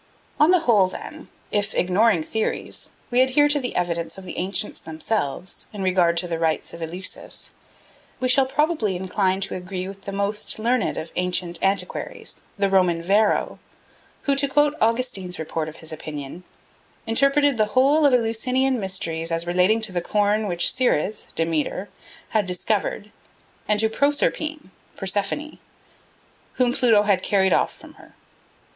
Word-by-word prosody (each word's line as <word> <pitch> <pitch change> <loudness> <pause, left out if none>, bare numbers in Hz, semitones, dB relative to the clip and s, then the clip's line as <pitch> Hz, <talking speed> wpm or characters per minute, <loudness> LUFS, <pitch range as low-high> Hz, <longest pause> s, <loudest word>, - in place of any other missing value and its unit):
On 300 +2 +6
the 365 -2 +5
whole, 215 - +4
then, 185 - -9 0.2
if, 205 0 0
ignoring 185 0 +3
theories, 220 +6 -3 0.2
we 245 +1 +4
adhere 265 +3 +4
to 290 0 +2
the 250 -2 -4
evidence 170 -1 -2
of 190 - -10
the - - -7
ancients 195 +3 -2
themselves 160 +1 -3
in 205 -2 -5
regard 180 -2 +2
to 175 +1 +1
the 165 -1 -3
rites 160 -1 -1
of 170 - -9
Eleusis, 175 +3 -5 0.7
we 255 - 0
shall 260 +1 +4
probably 290 - 0
incline 190 +1 0
to 200 - -2
agree 185 0 -5
with 195 0 -9
the 200 - -4
most 200 +1 0
learned 235 +1 0
of 160 - -5
ancient 180 -1 -1
antiquaries, 195 +1 -2 0.2
the 200 0 +2
Roman 180 -3 +2
Varro, 205 +4 +2 0.6
who, 280 - +2
to 280 +1 +2
quote 295 +1 +3
Augustine's 225 -6 0
report 160 0 -3
of 155 - -12
his 160 - -5
opinion, 155 +2 -7 0.6
"interpreted 275 +3 +3
the 215 - +5
whole 285 +4 +5
of 285 - +5
the 250 - +6
Eleusinian 250 +3 0
mysteries 165 -4 -2
as 165 0 0
relating 180 +6 +2
to 220 -3 0
the 175 -1 -1
corn 210 +3 +1
which 175 -2 +3
Ceres 220 - 0
(Demeter) 165 +4 -1 0.4
had 210 -3 +1
discovered, 205 +3 -1 0.6
and 210 0 +2
to 220 - +4
Proserpine 290 0 -1 0.3
(Persephone), 205 +10 -2 0.9
whom 245 -1 +2
Pluto 225 -5 +4
had 200 -3 +2
carried 190 -1 +2
off - - +2
from - - -15
her. - - -18
200 Hz, 155 wpm, -23 LUFS, 180-245 Hz, 0.9 s, On